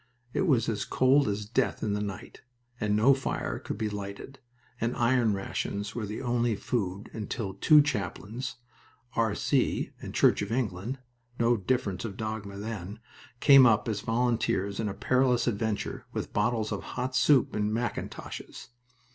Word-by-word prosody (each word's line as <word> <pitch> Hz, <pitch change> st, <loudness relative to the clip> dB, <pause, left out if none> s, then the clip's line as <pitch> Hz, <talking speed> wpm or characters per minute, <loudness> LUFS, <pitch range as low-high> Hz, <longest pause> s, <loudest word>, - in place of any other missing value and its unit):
It 190 Hz, -, +1 dB
was 125 Hz, -8 st, +3 dB
as 105 Hz, -3 st, -1 dB
cold 135 Hz, +2 st, +3 dB
as 105 Hz, 0 st, -2 dB
death 110 Hz, +3 st, 0 dB
in 105 Hz, -2 st, 0 dB
the 105 Hz, -, -1 dB
night, 100 Hz, +1 st, -6 dB, 0.4 s
and 105 Hz, -2 st, +1 dB
no 115 Hz, +6 st, +6 dB
fire 135 Hz, 0 st, -3 dB
could -, -, -5 dB
be 110 Hz, -, -1 dB
lighted, 105 Hz, +6 st, -7 dB, 0.4 s
and 115 Hz, +2 st, -1 dB
iron 120 Hz, -3 st, +3 dB
rations 100 Hz, +1 st, -3 dB
were 110 Hz, -3 st, -3 dB
the 105 Hz, +5 st, -5 dB
only 120 Hz, -2 st, +1 dB
food, 100 Hz, -2 st, -3 dB
until 105 Hz, -2 st, -4 dB
two 150 Hz, +9 st, +6 dB
chaplains, 110 Hz, -, -3 dB, 0.6 s
"R. 115 Hz, -3 st, +1 dB
C." -, -, +1 dB
and -, -, -6 dB
Church -, -, +4 dB
of 105 Hz, +1 st, -4 dB
England 115 Hz, 0 st, -2 dB, 0.4 s
(no 120 Hz, +1 st, +4 dB
difference 100 Hz, -3 st, -1 dB
of 100 Hz, -4 st, -5 dB
dogma 110 Hz, -2 st, -4 dB
then), 105 Hz, -1 st, -6 dB, 0.4 s
came 135 Hz, -3 st, +8 dB
up 110 Hz, 0 st, +3 dB
as 105 Hz, -3 st, -1 dB
volunteers 115 Hz, -4 st, 0 dB
in 110 Hz, -2 st, 0 dB
a 95 Hz, -, -5 dB
perilous 125 Hz, -1 st, +2 dB
adventure, 110 Hz, -2 st, -2 dB
with -, -, -4 dB
bottles 110 Hz, -3 st, 0 dB
of -, -, -2 dB, 0.2 s
hot 130 Hz, +1 st, -2 dB
soup 135 Hz, +1 st, +4 dB
in 105 Hz, 0 st, 0 dB
mackintoshes. 115 Hz, -1 st, -5 dB
110 Hz, 160 wpm, -28 LUFS, 100-125 Hz, 0.6 s, came